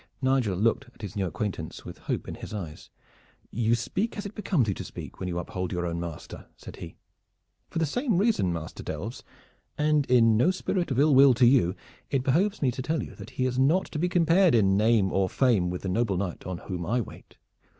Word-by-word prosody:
Nigel 130 -8 +1
looked 115 +6 +1
at - - -15
his 100 -2 -6
new 95 -2 0
acquaintance 85 -1 -5
with - - -9
hope - - -3
in - - -5
his - - -8
eyes. 85 -7 -7 0.6
"You 115 +1 +2
speak 195 - -2
as 205 - -5
it 200 - -6
becomes 185 - 0
you 100 - +1
to - - -6
speak - - -9
when 90 - -3
you 85 - -3
uphold 90 +1 -4
your 90 -1 -2
own 85 -1 -2
master," 85 -2 -7
said - - -11
he. - - -9 0.7
"For - - -6
the 165 - +2
same 230 - 0
reason, 200 - +2
Master 80 -2 -6
Delves, - - -6 0.5
and 150 -1 +2
in 115 -3 +5
no 125 +10 +4
spirit 185 -1 -1
of 130 - -1
ill 145 +2 +4
will 135 -1 +7
to 125 - +4
you, 120 -8 +4 0.3
it 135 -3 0
behooves 170 +8 +1
me 130 - +3
to 130 +2 -5
tell 155 +3 -1
you - - -9
that - - -9
he 130 - +1
is 130 0 -1
not 155 +8 +3
to 150 - -3
be 180 +3 +1
compared 175 -1 +4
in 95 -4 +4
name 105 -2 +3
or 95 -1 +2
fame 110 -9 +2
with 90 0 -5
the - - -3
noble 100 -1 0
knight 90 -2 -4
on 90 -1 -3
whom 90 0 -5
I 115 +8 0
wait. 115 - -9
120 Hz, 225 wpm, -27 LUFS, 95-150 Hz, 0.7 s, will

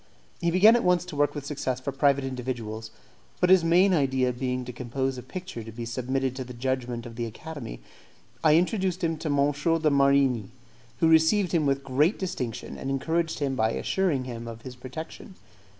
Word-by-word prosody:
He 170 - +1
began 200 +7 +6
at 240 - +1
once 180 0 +2
to 180 -4 -8
work 145 +1 +1
with 145 -1 -5
success 135 -3 -2
for 140 +2 -4
private 140 0 +2
individuals; 120 -4 -4 0.5
but 180 - +3
his 185 -3 +7
main 180 +4 +4
idea 130 -5 +2
being 125 0 -2
to 125 - -7
compose 130 +2 -2
a 125 - -6
picture 180 -1 -7
to 115 - -9
be 115 +1 -6
submitted 130 +2 -2
to 130 - -3
the 125 -1 -10
judgment 125 -1 -2
of 115 -1 -9
the 120 -1 -2
Academy, 130 - -8 0.6
I 155 -1 +6
introduced 185 +1 +1
him 165 -1 +1
to 155 - -5
M. 145 0 +3
de 155 +1 +1
Marigni, 140 -6 +3 0.5
who 165 - +5
received 160 +4 +4
him 160 -4 +2
with 135 0 0
great 145 - +2
distinction, 125 - -4
and 135 - -4
encouraged 160 +4 -1
him 140 -3 -1
by 110 -2 +1
assuring 175 -9 0
him 120 -2 -7
of 115 0 -8
his 130 -1 -8
protection. 145 +9 -9
135 Hz, 195 wpm, -27 LUFS, 125-165 Hz, 0.6 s, his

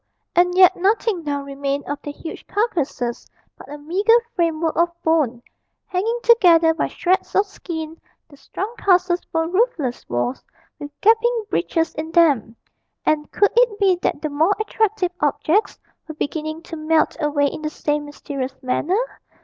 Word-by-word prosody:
and 360 +1 +3
yet 370 -1 +7
nothing 395 -1 0
now 285 -2 -2
remained 280 0 -3
of 290 0 -5
the 290 - -6
huge 320 +2 -9
carcases 310 - -2 0.3
but - - -13
a 295 - -6
meagre 390 +10 +3 0.2
framework 330 -2 0
of 340 +1 +3
bone, 280 -7 +1 0.4
hanging 440 +6 -1
together 340 -8 +5
by 320 - -1
shreds 370 +1 -1
of 400 - +4
skin; 320 -5 -7 0.3
the 290 - -17
strong 400 +9 -6
castles 360 -2 +2
were 325 0 0
roofless 350 - 0
walls 120 - -2 0.4
with 290 - -7
gaping 455 +1 +3
breaches 330 -1 0
in 315 +1 -5
them; 285 - +3 0.5
and 300 -1 0
could 410 - +3
it 475 -3 +3
be 385 -3 +4
that 345 - -2
the 310 - -1
more 320 +7 +2
attractive 430 -3 0
objects 315 +7 +1 0.3
were 315 - -8
beginning 310 +2 -4
to 330 - -8
melt 310 0 +1
away 295 -2 +1
in 285 - -3
the 305 - -2
same 295 -1 -2
mysterious 275 -2 -6
manner? 295 +9 0
325 Hz, 155 wpm, -21 LUFS, 290-380 Hz, 0.5 s, yet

